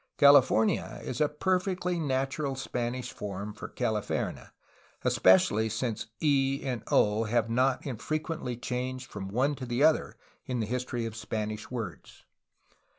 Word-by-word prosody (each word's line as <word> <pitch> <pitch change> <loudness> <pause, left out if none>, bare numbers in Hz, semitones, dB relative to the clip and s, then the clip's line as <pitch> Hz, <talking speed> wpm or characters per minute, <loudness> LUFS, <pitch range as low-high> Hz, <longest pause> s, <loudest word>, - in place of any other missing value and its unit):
"Cal 140 0 +8
ifornia" 125 -5 +3
is 125 - -4
a 150 - +4
perfectly 180 +2 0
natural 135 -1 -1
Spanish 125 -1 -3
form 100 +1 -5
for 105 - -7
"Calif 105 -2 -2
erne," - - -3 0.5
especially 105 +4 +4
since 115 0 -2
"e" 140 -2 +2
and 125 -4 -2
"o" 105 +2 +3
have 115 +1 +1
not 130 +2 +2
infrequently 150 0 -3
changed 125 +1 -4
from 95 -2 -5
one 130 +9 +1
to 135 -2 -6
the 120 +4 +1
other 155 0 +3 0.3
in 125 -2 -1
the 110 - 0
history 120 0 -2
of 115 -1 -5
Spanish 110 -1 -4
words. 105 - -7
125 Hz, 145 wpm, -29 LUFS, 110-140 Hz, 0.5 s, Cal